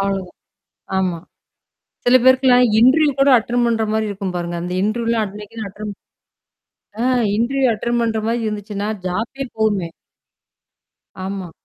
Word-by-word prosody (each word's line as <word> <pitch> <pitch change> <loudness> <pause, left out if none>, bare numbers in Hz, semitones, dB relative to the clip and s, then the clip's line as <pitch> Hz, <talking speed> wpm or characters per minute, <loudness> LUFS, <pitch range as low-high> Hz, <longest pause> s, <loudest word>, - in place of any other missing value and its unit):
அவ்ளோதான். 195 -2 -2 0.6
ஆமா. 185 -2 0 0.9
சில 245 +1 +5
பேருக்குலாம் 260 -1 +5
இன்டர்வியூ 285 +6 +5
கூட 275 +1 +5
அட்டெண்ட் 240 +2 0
பண்ற 225 -1 +1
மாரி 220 0 0
இருக்கும் 195 -2 -4
பாருங்க. 175 0 -3
அந்த 180 +1 -4
இன்டர்வியூலாம் 230 +1 0
அட்னைக்கனு 210 +2 -8
அட்டெண்ட். 205 +1 -7 1.1
ஆ - - 0 0.3
இன்டர்வியூ 260 +4 +1
அட்டெண்ட் 235 +3 -1
பண்ற 225 -1 0
மாரி 235 +1 0
இருந்துச்சுன்னா 205 -1 -4 0.2
ஜாப்பே 225 +9 -3
போவுமே. 205 -6 0 1.3
ஆமா. 190 -2 -5
220 Hz, 125 wpm, -19 LUFS, 195-240 Hz, 1.3 s, சில